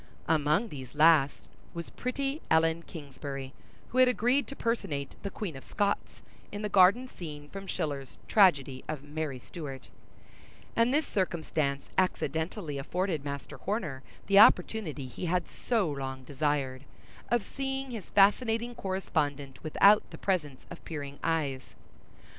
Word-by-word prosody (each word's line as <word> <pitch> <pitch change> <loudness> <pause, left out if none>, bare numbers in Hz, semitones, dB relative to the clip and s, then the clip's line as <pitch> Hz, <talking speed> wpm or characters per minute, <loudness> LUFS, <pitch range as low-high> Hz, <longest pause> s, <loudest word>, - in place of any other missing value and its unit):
Among 155 +8 +2
these 130 -4 -9
last 150 -2 +5 0.3
was 170 0 -6
pretty 275 +4 -2
Ellen 160 +1 +3
Kingsbury, 140 -4 -7 0.4
who 255 - 0
had 255 - +8
agreed 250 +4 +2
to 275 - -7
personate 185 - -2
the 200 - -3
Queen 190 -5 -5
of 135 - -9
Scots, 205 -1 -2 0.3
in 205 +1 -5
the 210 - -1
garden 200 +7 +5
scene 150 -9 -8
from 195 +2 -8
Schiller's 140 -6 -3
tragedy 145 -10 +4
of 150 -3 -4
Mary 145 -2 -4
Stuart; 135 0 -8 0.9
and 230 +2 +4
this 300 +2 +2
circumstance 155 -7 -1
accidentally 160 -2 -1
afforded 175 +1 -1
Master 140 -1 -6
Horner 180 - -3 0.2
the 200 0 +6
opportunity 180 -8 +4
he 130 +8 -5
had 180 +1 0
so 220 -10 0
long 135 -2 -5
desired, 140 -1 -1 0.4
of 240 -3 +2
seeing 270 +2 -4
his 225 -5 -7
fascinating 225 +4 +3
correspondent 145 - -2
without 200 +6 +5
the - - -9
presence 150 -9 -2
of - - -9
peering 145 -3 -6
eyes. 145 -6 -1
165 Hz, 135 wpm, -30 LUFS, 140-205 Hz, 0.9 s, had